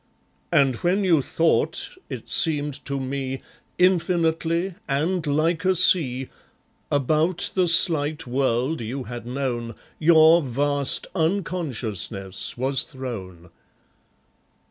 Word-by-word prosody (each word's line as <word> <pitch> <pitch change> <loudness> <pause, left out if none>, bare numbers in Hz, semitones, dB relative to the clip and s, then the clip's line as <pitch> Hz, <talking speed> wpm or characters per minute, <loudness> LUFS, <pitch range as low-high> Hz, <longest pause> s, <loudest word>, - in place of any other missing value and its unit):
And 135 -4 +2
when 185 - 0
you 170 -6 +3
thought, 165 +4 0 0.2
it - - -8
seemed 145 -3 -1
to 140 -1 -3
me, 135 0 -5 0.3
Infinitely, 170 0 +1
and 160 +4 -1
like 160 +3 0
a 190 0 +2
sea, 135 -8 +4 0.6
About 155 +5 0
the 185 -2 +1
slight 160 -3 +5
world 130 +3 -1
you 125 +4 -5
had 120 -1 -8
known 120 -3 -4 0.2
Your 160 +1 +5
vast 140 +1 0
unconsciousness 135 - -2
was 135 +2 +1
thrown. 95 - -8
145 Hz, 100 wpm, -23 LUFS, 130-165 Hz, 0.6 s, slight